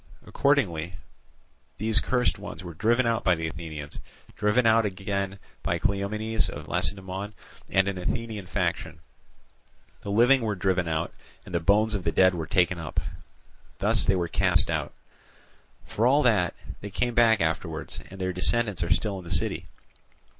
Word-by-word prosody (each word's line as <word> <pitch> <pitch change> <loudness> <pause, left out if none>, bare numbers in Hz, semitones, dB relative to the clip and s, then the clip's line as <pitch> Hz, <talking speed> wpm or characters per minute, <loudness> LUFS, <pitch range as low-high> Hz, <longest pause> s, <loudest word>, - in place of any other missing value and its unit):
Accordingly 90 - +1 0.8
these 110 +1 +4
cursed 125 -5 0
ones 105 -2 -8
were 85 -2 -7
driven 115 +9 +2
out 115 0 0
by 90 -2 +4
the 80 0 -4
Athenians, 80 -3 -6 0.4
driven 105 +3 +2
out 115 0 +5
again 100 0 -3 0.2
by - - -1
Cleomenes 105 +3 -1
of - - -8
Lacedaemon 95 +1 -3 0.3
and 95 0 +3
an 100 -2 -2
Athenian 110 0 -3
faction; - - -2 1.0
the - - -7
living 120 +6 +5
were 110 -3 -1
driven 95 -2 0
out, 80 0 -2 0.3
and - - -11
the 85 - +2
bones 105 +5 +3
of 100 -4 -2
the 80 - 0
dead 95 +3 +4
were 80 -3 -4
taken 90 -1 +2
up; 80 -4 -3 0.8
thus - - +3
they 95 - +2
were 90 -2 0
cast 90 0 +2
out. 75 -4 -2 0.9
For 115 +3 +1
all 145 +3 +4
that, 105 -9 +2 0.2
they 100 - -7
came 120 +5 -1
back 115 -2 +5
afterwards, 80 -2 -2
and 95 - -11
their 95 -1 -1
descendants 105 +1 +2
are 85 - -1
still 100 -3 0
in - - -10
the 85 - -10
city. 80 -2 0
100 Hz, 160 wpm, -26 LUFS, 90-110 Hz, 1.0 s, out